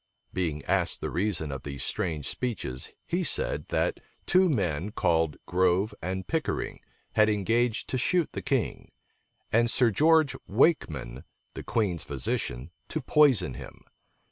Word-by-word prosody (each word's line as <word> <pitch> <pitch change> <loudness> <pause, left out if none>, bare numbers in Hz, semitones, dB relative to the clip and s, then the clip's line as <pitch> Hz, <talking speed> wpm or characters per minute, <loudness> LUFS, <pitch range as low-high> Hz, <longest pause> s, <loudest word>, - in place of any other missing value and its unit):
Being 80 -6 -2
asked - - +1
the - - -4
reason 90 -6 -1
of 70 -1 -5
these 70 -2 -5
strange 75 -5 -2
speeches, 90 - -3
he 180 +2 -1
said, - - -1
that - - 0 0.3
two 185 0 +4
men, 90 - 0
called 80 -6 +1
Grove 95 +3 +2
and 95 +1 -3
Pickering, 160 -2 -2 0.3
had 110 0 +4
engaged 115 +3 +1
to 130 - -1
shoot 175 +5 +1
the - - -5
king, - - -2 0.6
and 115 +1 +4
Sir 120 -1 +3
George 155 +3 +4
Wakeman, 80 - +1 0.3
the - - -6
queen's 100 -7 -1
physician, 65 0 -3 0.2
to 155 - -2
poison 140 - +4
him. - - -10
100 Hz, 140 wpm, -28 LUFS, 80-130 Hz, 0.6 s, two